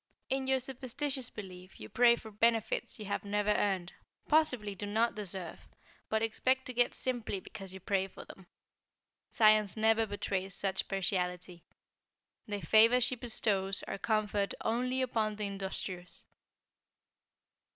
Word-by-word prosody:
In 265 0 0
your 265 0 +3
superstitious 265 +1 -3
belief 185 -2 -10
you 110 - -8
pray 240 - +5
for 220 -2 -11
benefits 225 +1 +1
you 215 - -7
have 200 - -2
never 210 +1 0
earned, 190 -4 0 0.3
possibly 250 -10 +3
do 200 +1 -6
not 225 +3 +2
deserve, 190 -4 -6 0.4
but 220 0 +1
expect 260 +4 +1
to 255 - -5
get 245 0 +2
simply 245 -6 -2
because 190 0 -9
you 190 - -8
pray 190 0 0
for - - -12
them. 190 -2 -13 0.8
Science 215 -2 +4
never 225 0 +3
betrays 195 -2 -2
such 195 -1 -1
partiality. 180 -2 -2 0.8
The 205 -1 -3
favors 225 +8 +6
she 255 - +2
bestows 205 -5 0
are 195 - -5
conferred 210 -1 0
only 250 +3 0
upon 220 -4 0
the 210 0 -3
industrious." 190 -2 -4
210 Hz, 140 wpm, -32 LUFS, 195-235 Hz, 0.8 s, favors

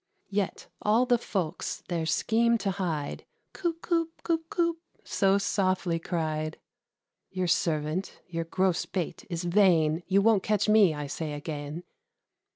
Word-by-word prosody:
Yet 200 -1 -1 0.2
all 220 +4 +3
the 245 -2 +3
folks, 185 -6 -3
their 170 -3 -1
scheme 235 +6 +3
to 195 -2 -1
hide, 165 -7 -3 0.3
"Coop, 335 -3 -3
coop, 330 -2 +1
coop, 330 -1 -1
coop," 335 -4 0 0.2
so 195 -1 +2
softly 185 -3 0
cried. 155 -2 -2 0.7
"Your 185 -1 -2
servant; 165 0 0
your 165 -2 -4
gross 185 +1 +1
bait 180 -4 -4
is 170 -1 -3
vain; 170 -4 +4
You 195 +1 +4
won't 220 -3 +5
catch 210 0 +1
me, 210 -6 +5
I 150 0 -4
say 150 +2 -4
again." 145 +2 -5
185 Hz, 140 wpm, -28 LUFS, 165-215 Hz, 0.7 s, won't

